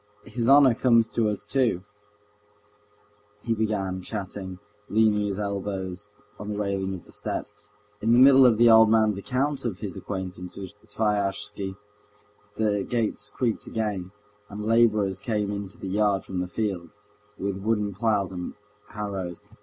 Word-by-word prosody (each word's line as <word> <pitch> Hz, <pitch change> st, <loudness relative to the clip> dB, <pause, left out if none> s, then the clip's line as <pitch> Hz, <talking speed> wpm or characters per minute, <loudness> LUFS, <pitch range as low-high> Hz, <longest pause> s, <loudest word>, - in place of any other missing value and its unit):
His 120 Hz, 0 st, -1 dB
honor 135 Hz, -2 st, +7 dB
comes 115 Hz, -1 st, +3 dB
to 110 Hz, -2 st, +1 dB
us 105 Hz, 0 st, -3 dB
too," 115 Hz, -5 st, +1 dB, 1.6 s
he 115 Hz, -, 0 dB
began, 100 Hz, -4 st, -1 dB
chatting, 95 Hz, -2 st, -5 dB, 0.3 s
leaning 105 Hz, -1 st, +3 dB
his 100 Hz, -1 st, -3 dB
elbows 100 Hz, -1 st, -4 dB, 0.3 s
on 105 Hz, -, -6 dB
the 105 Hz, -, -3 dB
railing 100 Hz, -2 st, -1 dB
of 90 Hz, -, -11 dB
the -, -, -17 dB
steps. 105 Hz, -, -4 dB, 0.5 s
In 110 Hz, -, +2 dB
the 120 Hz, -, +6 dB
middle 135 Hz, 0 st, +8 dB
of 115 Hz, -3 st, +3 dB
the 120 Hz, +1 st, +6 dB
old 110 Hz, -1 st, +8 dB
man's 110 Hz, -2 st, +3 dB
account 135 Hz, +6 st, -1 dB
of 115 Hz, -7 st, -2 dB
his 100 Hz, -5 st, -5 dB
acquaintance 90 Hz, -2 st, -6 dB
with 95 Hz, 0 st, -7 dB
Sviazhsky, 100 Hz, -2 st, -2 dB, 0.8 s
the 105 Hz, -2 st, +1 dB
gates 110 Hz, -3 st, -1 dB
creaked 120 Hz, -1 st, -2 dB
again, 105 Hz, -5 st, -3 dB, 0.4 s
and 105 Hz, +1 st, -6 dB
laborers 110 Hz, -4 st, +3 dB
came 105 Hz, -1 st, -1 dB
into 100 Hz, -1 st, -6 dB
the 95 Hz, -, -6 dB
yard 100 Hz, 0 st, +1 dB
from 95 Hz, -, -4 dB
the 90 Hz, -, -2 dB
fields, 100 Hz, -1 st, -4 dB, 0.4 s
with 100 Hz, 0 st, -2 dB
wooden 105 Hz, 0 st, 0 dB
ploughs 105 Hz, -2 st, 0 dB
and 90 Hz, -1 st, -6 dB, 0.3 s
harrows. 100 Hz, -4 st, -5 dB
105 Hz, 150 wpm, -26 LUFS, 95-110 Hz, 1.6 s, middle